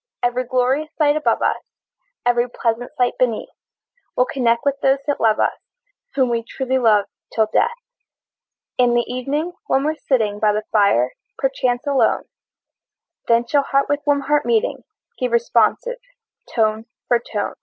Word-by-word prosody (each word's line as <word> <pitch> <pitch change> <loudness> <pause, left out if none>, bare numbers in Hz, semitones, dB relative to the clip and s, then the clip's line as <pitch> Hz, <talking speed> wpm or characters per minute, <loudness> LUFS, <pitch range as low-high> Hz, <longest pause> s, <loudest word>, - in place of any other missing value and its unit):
Every 245 +1 0
glorious 255 +5 0
sight 295 -2 +3
above 305 - +1
us, - - 0 0.6
Every 245 0 +2
pleasant 235 0 -2
sight 245 -1 +1
beneath, 240 -4 0 0.7
We'll 250 - +4
connect 235 -2 0
with 280 0 +1
those 270 0 +3
that 290 - -1
love 220 -1 +3
us, - - +2 0.6
Whom 260 -3 +2
we 230 -1 0
truly 260 +2 -2
love 215 -4 +4 0.3
till 220 - +2
death! - - +4 1.1
In 245 -1 +4
the 240 - +2
evening, 275 +7 -2 0.2
when 270 - +2
we're 305 +2 +1
sitting 215 -6 +1
By 210 -1 +3
the 215 +1 -1
fire, 200 - +3 0.3
perchance 255 -1 -1
alone, 280 -2 +2 1.0
Then 235 0 +3
shall 285 +4 +2
heart 275 0 0
with 290 0 +1
warm 285 -1 +3
heart 295 +2 +1
meeting, 230 -2 0 0.3
Give 250 -2 -1
responsive 235 - +1 0.5
tone 220 0 0 0.2
for 240 - +3
tone. 210 -3 -4
245 Hz, 155 wpm, -20 LUFS, 230-275 Hz, 1.1 s, We'll